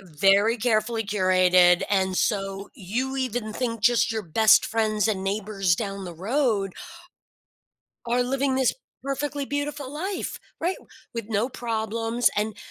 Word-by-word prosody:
very 195 +6 +3
carefully 225 0 0
curated, 185 -3 +4
and 190 -2 +1
so 195 -2 -1
you 250 +5 -3
even 245 -4 -2
think 230 -1 -3
just 235 0 +3
your 220 - -2
best 210 +5 +4
friends 215 -1 0
and 195 -3 -1
neighbors 195 -2 0
down 195 -1 -5
the 175 -2 -7
road 205 - 0 1.3
are 245 +1 +2
living 265 +2 0
this 260 -2 +2 0.3
perfectly 280 +1 -3
beautiful 285 -1 -4
life. 370 +6 -4 0.2
Right, 355 +3 0 0.4
with 230 -3 -4
no 220 +2 0
problems, 230 -1 -1
and 210 0 -1
220 Hz, 130 wpm, -25 LUFS, 195-250 Hz, 1.3 s, curated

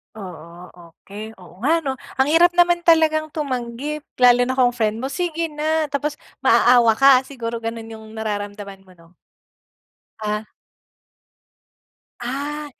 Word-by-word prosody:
Oo, 175 -3 -11
okay. 200 +6 -11
Oo 180 0 -16
nga 320 +6 +1
'no? 265 -1 -3 0.2
Ang 265 +1 +2
hirap 345 +2 +5
naman 350 0 +4
talagang 315 -2 +4
tumanggi, 275 0 -4 0.2
lalo 245 0 +6
na 260 - -1
kung 250 -2 +3
friend 225 -1 -1
mo, 270 - -3
"Sige 335 -2 -2
na." 310 0 -1
Tapos, 290 +1 -2 0.2
maaawa 240 -2 +5
ka, 275 +2 +5 0.2
siguro 235 -4 -5
gano'n 225 0 -6
'yong 220 0 -11
nararamdaman 205 -2 -5
mo 185 - -17
'no? 165 0 -20 1.1
Ah. 210 0 -3 1.7
Ah! 285 +4 -4
245 Hz, 130 wpm, -21 LUFS, 215-300 Hz, 1.7 s, lalo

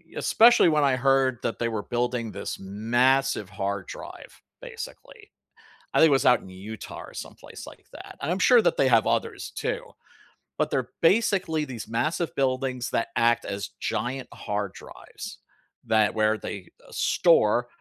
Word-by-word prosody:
especially 235 -5 +5
when 150 -2 +2
I 135 -2 +3
heard 135 -1 +2
that 115 - -2
they 115 - -1
were 110 -2 -3
building 120 -1 -2
this 100 - -6
massive 115 +3 +1
hard 100 0 -4
drive, - - -10 0.2
basically. 470 -2 -10 0.6
I - - +3
think 160 - +8
it - - +1
was 135 -2 +2
out 125 - +5
in 95 - -13
Utah 100 +4 -9
or - - -13
someplace - - -10
like - - -14
that, - - -11
and 155 - -2
I'm 185 - -1
sure 245 +5 +6
that 185 - +2
they 135 - +3
have 115 -3 +4
others - - -2
too, - - -2 0.8
but - - 0
they're 125 -2 -1
basically 180 -4 +2
these 120 -6 -7
massive 125 +6 -1
buildings 130 -2 -1
that 115 - -1
act 120 0 +2
as 100 0 -5
giant 125 +4 -3
hard 105 -1 -4
drives - - -11 0.5
that 110 -2 +2
where 110 0 +2
they 95 -4 -7 0.2
store 120 -8 +3
125 Hz, 160 wpm, -26 LUFS, 110-145 Hz, 0.8 s, think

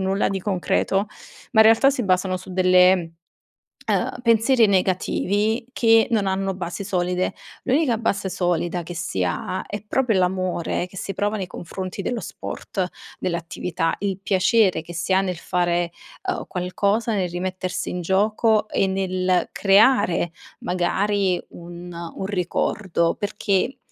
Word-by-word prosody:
nulla 190 +1 +1
di 195 -1 -2
concreto, 195 +1 0 0.5
ma 220 - +6
in 220 - +8
realtà 225 +5 +6
si 270 -3 -2
basano 185 0 +1
su 185 +1 -10
delle 180 -2 +4 0.8
uhm, - - 0
pensieri 230 +1 +4
negativi 200 +3 +1
che 225 -3 +4
non 215 -4 +1
hanno 195 0 -1
basi 180 +2 -5
solide. 180 -1 0 0.3
L'unica 260 -2 +2
base 205 -4 -1
solida 175 -1 -1
che 175 +2 -7
si 160 - -2
ha, 90 - -3
è 205 -1 -6
proprio 230 -2 +1
l'amore 180 -1 0
che 180 - -15
si 195 - -4
prova 205 +1 -1
nei 190 - -3
confronti 185 +2 -6
dello 235 +4 -2
sport, 185 +1 -4 0.3
dell'attività, 170 -1 -2
il 195 -2 -2
piacere 195 -2 +3
che 170 - -10
si 175 +3 -1
ha 190 - +4
nel 180 -3 -3
fare, 175 -1 0 0.4
uhm, 370 - -1
qualcosa, 200 +5 0
nel 185 -3 -1
rimettersi 185 +1 -3
in 180 - -4
gioco 215 +4 +2
e - - +1
nel 185 -1 0
creare, 200 -4 +4 0.3
magari, 185 +1 0
un 175 +1 -10
un 170 +2 -6
ricordo, 180 -2 0
perché, 205 +3 -1
190 Hz, 140 wpm, -23 LUFS, 180-205 Hz, 0.8 s, in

